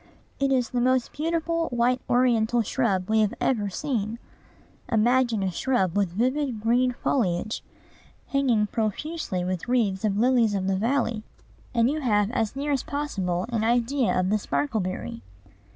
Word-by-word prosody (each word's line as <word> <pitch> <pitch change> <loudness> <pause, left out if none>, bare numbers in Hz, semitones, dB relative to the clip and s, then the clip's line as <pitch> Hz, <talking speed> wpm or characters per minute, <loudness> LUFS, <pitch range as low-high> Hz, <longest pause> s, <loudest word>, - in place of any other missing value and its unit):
It 275 0 +1
is 250 -3 +1
the 245 - 0
most 255 0 +2
beautiful 330 +1 -1
white 245 +1 +1
ornamental 240 -2 +3
shrub 200 -6 0
we 220 0 +2
have 210 -2 +1
ever 210 -6 0
seen. 225 -1 -2 0.7
Imagine 235 -1 +2
a 190 - 0
shrub 190 -3 0
with 200 -3 +2
vivid 255 +3 0
green 245 +3 +2
foliage, 215 -5 -1 0.6
hanging 255 -6 +2
profusely 220 - -2
with 185 +1 -3
wreaths 220 -6 +1
of 205 -2 +1
lilies 235 -2 +3
of 190 -1 -1
the 195 - +1
valley, 230 +1 0 0.5
and 230 0 +4
you 300 +4 0
have 210 -4 +2
as 225 -1 -1
near 285 +2 -2
as 275 -3 +1
possible 195 -12 -2
an 230 -3 -1
idea 235 -3 +1
of 185 +1 0
the 215 - +2
sparkleberry. 195 - -2
235 Hz, 150 wpm, -25 LUFS, 205-260 Hz, 0.7 s, and